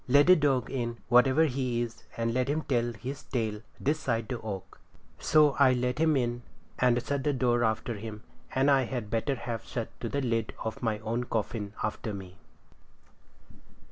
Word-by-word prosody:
'Let 140 Hz, +3 st, +6 dB
the 185 Hz, -, +8 dB
dog 135 Hz, -6 st, +1 dB
in, 120 Hz, -3 st, -2 dB
whatever 130 Hz, +6 st, +5 dB
he 130 Hz, -4 st, -1 dB
is, 115 Hz, -1 st, -8 dB
and 115 Hz, 0 st, 0 dB
let 130 Hz, +1 st, +1 dB
him 150 Hz, +2 st, 0 dB
tell 120 Hz, -3 st, 0 dB
his 125 Hz, +5 st, -6 dB
tale 110 Hz, -4 st, -2 dB, 0.2 s
this 150 Hz, +3 st, +1 dB
side 115 Hz, -6 st, -1 dB
the 125 Hz, -3 st, -3 dB
oak.' 100 Hz, -4 st, -6 dB, 0.4 s
So 150 Hz, -2 st, +5 dB
I 130 Hz, -2 st, +6 dB
let 125 Hz, +2 st, -1 dB
him 160 Hz, -2 st, +4 dB
in 120 Hz, -1 st, -1 dB, 0.4 s
and 125 Hz, -1 st, +4 dB
shut 140 Hz, 0 st, -1 dB
the 145 Hz, -1 st, +1 dB
door 120 Hz, -2 st, +2 dB
after 110 Hz, +1 st, 0 dB
him, 110 Hz, 0 st, -7 dB, 0.3 s
and 135 Hz, +2 st, +4 dB
I 135 Hz, -2 st, +4 dB
had 115 Hz, -4 st, -4 dB
better 115 Hz, +5 st, 0 dB
have 115 Hz, -2 st, -5 dB
shut 115 Hz, -3 st, -4 dB
to 115 Hz, -, -3 dB
the 140 Hz, -, -1 dB
lid 115 Hz, -3 st, -1 dB
of 110 Hz, -, -4 dB
my 110 Hz, -3 st, 0 dB
own 115 Hz, +3 st, -2 dB
coffin 105 Hz, -2 st, -3 dB
after 110 Hz, 0 st, -3 dB
me. 95 Hz, -1 st, -10 dB
120 Hz, 185 wpm, -29 LUFS, 115-135 Hz, 0.4 s, the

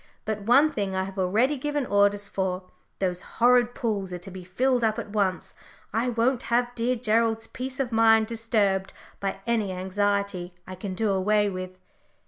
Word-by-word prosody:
But 215 Hz, -1 st, -2 dB
one 280 Hz, +6 st, +6 dB
thing 200 Hz, -8 st, -2 dB
I 190 Hz, -, 0 dB
have 195 Hz, +1 st, -7 dB
already 220 Hz, +10 st, +2 dB
given 290 Hz, +1 st, -2 dB
orders 205 Hz, -1 st, +2 dB
for: 190 Hz, -2 st, -2 dB, 0.3 s
those 180 Hz, -2 st, -1 dB, 0.2 s
horrid 245 Hz, 0 st, +4 dB
pools 200 Hz, -5 st, -2 dB
are 180 Hz, -, -4 dB
to 195 Hz, -, -9 dB
be 185 Hz, 0 st, -8 dB
filled 245 Hz, +7 st, +1 dB
up 220 Hz, 0 st, +1 dB
at 225 Hz, -3 st, -5 dB
once. 195 Hz, -3 st, -1 dB, 0.4 s
I 230 Hz, +3 st, +1 dB
won't 240 Hz, +2 st, +1 dB
have 240 Hz, +1 st, +1 dB
dear 245 Hz, +1 st, 0 dB
Gerald's 225 Hz, -1 st, +1 dB
peace 255 Hz, +3 st, -6 dB
of 260 Hz, -3 st, -1 dB
mind 225 Hz, -1 st, +5 dB
disturbed 215 Hz, -4 st, 0 dB, 0.3 s
by 195 Hz, 0 st, -3 dB
any 225 Hz, -4 st, 0 dB
anxiety 190 Hz, -1 st, -1 dB
I 185 Hz, -, -8 dB
can 185 Hz, 0 st, -6 dB
do 215 Hz, +1 st, +1 dB
away 205 Hz, +2 st, +2 dB
with." 185 Hz, 0 st, -6 dB
215 Hz, 175 wpm, -26 LUFS, 190-235 Hz, 0.4 s, one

